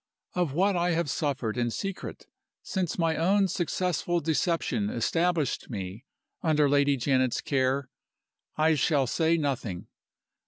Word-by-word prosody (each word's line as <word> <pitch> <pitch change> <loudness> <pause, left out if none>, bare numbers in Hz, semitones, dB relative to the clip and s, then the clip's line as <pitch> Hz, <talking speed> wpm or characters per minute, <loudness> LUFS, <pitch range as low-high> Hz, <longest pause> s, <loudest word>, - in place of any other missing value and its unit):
"Of 175 -6 0
what 190 +5 +2
I 175 0 +1
have 165 -4 0
suffered 130 -6 -1
in 120 -1 +1
secret 195 - -5 0.4
since 185 -4 -2
my 165 -2 +1
own 195 +4 +3
successful 175 -1 -1
deception 170 +6 0
established 170 - 0
me 100 +1 -6 0.4
under 150 -2 +3
Lady 140 0 +3
Janet's 130 -1 +1
care 135 0 0 0.7
I 160 +1 +4
shall 145 -2 +2
say 165 +6 +2
nothing. 130 - -2
155 Hz, 125 wpm, -28 LUFS, 135-175 Hz, 0.7 s, I